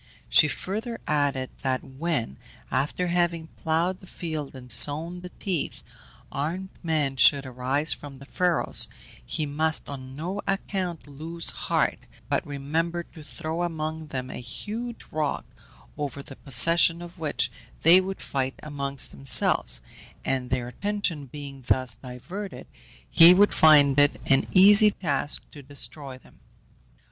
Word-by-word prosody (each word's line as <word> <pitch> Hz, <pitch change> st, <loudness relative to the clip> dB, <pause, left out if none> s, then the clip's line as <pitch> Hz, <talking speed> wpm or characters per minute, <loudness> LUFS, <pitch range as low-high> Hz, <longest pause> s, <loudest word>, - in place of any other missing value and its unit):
She 150 Hz, -, +7 dB
further 220 Hz, +9 st, -3 dB
added 145 Hz, -3 st, 0 dB
that 130 Hz, -1 st, -1 dB
when, 135 Hz, -, -3 dB, 0.3 s
after 150 Hz, +7 st, -1 dB
having 170 Hz, -2 st, 0 dB
ploughed 170 Hz, +3 st, -1 dB
the 185 Hz, -, -15 dB
field 155 Hz, -6 st, -5 dB
and 125 Hz, -1 st, -9 dB
sown 165 Hz, +5 st, +4 dB
the 180 Hz, -, -8 dB
teeth, 185 Hz, -6 st, -2 dB, 0.5 s
armed 170 Hz, +7 st, -3 dB
men 150 Hz, -5 st, -1 dB
should 140 Hz, +3 st, +5 dB
arise 130 Hz, +4 st, 0 dB
from 140 Hz, -2 st, -10 dB
the 140 Hz, -, -13 dB
furrows, 175 Hz, +3 st, +1 dB, 0.4 s
he 150 Hz, -, -3 dB
must 155 Hz, +2 st, 0 dB
on 130 Hz, -2 st, -8 dB
no 180 Hz, +7 st, -4 dB
account 190 Hz, -3 st, -2 dB
lose 160 Hz, +4 st, -1 dB
heart, -, -, 0 dB, 0.3 s
but -, -, +1 dB
remember 160 Hz, +5 st, -2 dB
to 160 Hz, -, -11 dB
throw 155 Hz, +3 st, -5 dB
among 160 Hz, -2 st, -3 dB
them 130 Hz, -3 st, -5 dB
a -, -, -6 dB
huge 220 Hz, -, -6 dB
rock, 150 Hz, -2 st, -2 dB, 0.5 s
over 140 Hz, -1 st, -5 dB
the 135 Hz, -, -11 dB
possession 165 Hz, +6 st, +3 dB
of 175 Hz, 0 st, -12 dB
which 155 Hz, -3 st, -1 dB, 0.3 s
they 175 Hz, +4 st, +8 dB
would 190 Hz, +1 st, -6 dB
fight 135 Hz, -1 st, -2 dB
among 140 Hz, -2 st, -4 dB, 0.2 s
themselves, -, -, +2 dB, 0.4 s
and 130 Hz, -2 st, -1 dB
their 125 Hz, -2 st, -1 dB
attention 185 Hz, -3 st, -2 dB
being 140 Hz, 0 st, -9 dB
thus 130 Hz, -3 st, +1 dB
diverted 165 Hz, -, -8 dB, 0.4 s
he 170 Hz, -, +8 dB
would 205 Hz, +2 st, +5 dB
find 145 Hz, -3 st, +6 dB
it 145 Hz, 0 st, +3 dB
an 135 Hz, 0 st, +3 dB
easy 205 Hz, +3 st, +8 dB
task 145 Hz, -7 st, -2 dB
to 145 Hz, -, -11 dB
destroy 140 Hz, 0 st, -7 dB
them. -, -, -21 dB
150 Hz, 140 wpm, -26 LUFS, 135-175 Hz, 0.5 s, they